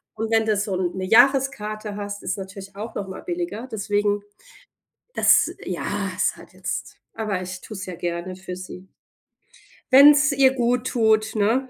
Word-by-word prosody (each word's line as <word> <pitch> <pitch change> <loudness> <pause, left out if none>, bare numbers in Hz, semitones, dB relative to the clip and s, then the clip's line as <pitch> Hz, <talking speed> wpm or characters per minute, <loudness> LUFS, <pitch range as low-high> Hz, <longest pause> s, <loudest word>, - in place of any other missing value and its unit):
Und 220 +1 -3
wenn 225 0 +3
du 215 -1 +2
so 200 -2 -1
'ne 185 +1 -2
Jahreskarte 225 -3 +2
hast, 205 0 -6
ist - - -2
natürlich 195 0 -9
auch 220 +3 -7
noch 200 - -4
mal 190 - -8
billiger. 345 - -4
Deswegen 205 -2 -1 0.9
das - - +4
ja, - - -4 0.3
ist - - +1
halt - - -15
jetzt - - -5 0.2
aber 205 -4 -2
ich 185 0 -7
tue 215 - -9
es 195 - -6
ja 180 -2 -7
gerne 175 +1 -4
für 185 -1 -7
sie. 185 0 -10 1.0
Wenn's 290 +2 +8
ihr 270 -1 +4
gut 245 0 0
tut, 220 -2 +2
ne? 230 +6 +1
215 Hz, 165 wpm, -23 LUFS, 190-245 Hz, 1.0 s, Wenn's